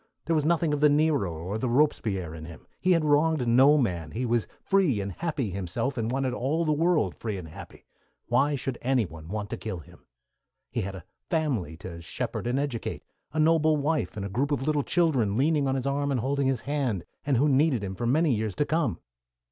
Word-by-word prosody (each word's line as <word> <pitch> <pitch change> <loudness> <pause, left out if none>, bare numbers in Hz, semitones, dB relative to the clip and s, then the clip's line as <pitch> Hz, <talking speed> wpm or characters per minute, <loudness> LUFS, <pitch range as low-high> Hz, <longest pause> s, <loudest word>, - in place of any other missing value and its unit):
There 165 - +1
was 150 -1 +1
nothing 165 -2 +2
of 145 - 0
the 150 0 +6
Nero 145 - +2
or 90 +7 -4
the 125 - -1
Robespierre 110 - +1
in 80 -1 -8
him. 80 0 -11
He 185 +1 +3
had 165 -3 +2
wronged 150 -2 +3
no 135 +6 +6
man. 90 - -1
He 120 +10 -3
was 120 -2 +1 0.2
free 185 - +2
and 100 0 -3
happy 145 - -2
himself, 95 +8 -2
and 115 -2 -1
wanted 130 0 -1
all 150 +7 0
the 155 - +2
world 155 - +2
free 110 -4 -4
and 90 -3 -7
happy. 80 - -12 0.4
Why 145 +2 +2
should 135 -2 -4
anyone 105 -12 -1
want 105 +2 -4
to - - -3
kill 110 -4 -5
him? 80 - -15 0.6
He - - -1
had 95 0 -4
a 90 -2 -10 0.2
family 130 - -1
to 85 -1 -8
shepherd 85 - -4
and 125 +2 0
educate, 140 -5 -3 0.3
a 155 - -2
noble 155 -1 +4
wife 150 -4 -1
and 100 - -3
a - - -2
group 130 +8 0
of 145 -3 -1
little 150 0 +1
children 135 - +1
leaning 145 +1 +2
on 135 - +1
his 130 -1 -2
arm 140 +1 0
and 135 -3 +1
holding 140 +2 0
his 130 -3 0
hand, 135 - -1 0.2
and 140 -3 +1
who 145 +5 +3
needed 135 -4 +3
him 95 -1 -4
for 120 +5 -3
many 150 +3 +3
years 110 -3 -2
to 150 - +1
come. 150 - 0
130 Hz, 220 wpm, -27 LUFS, 105-150 Hz, 0.6 s, the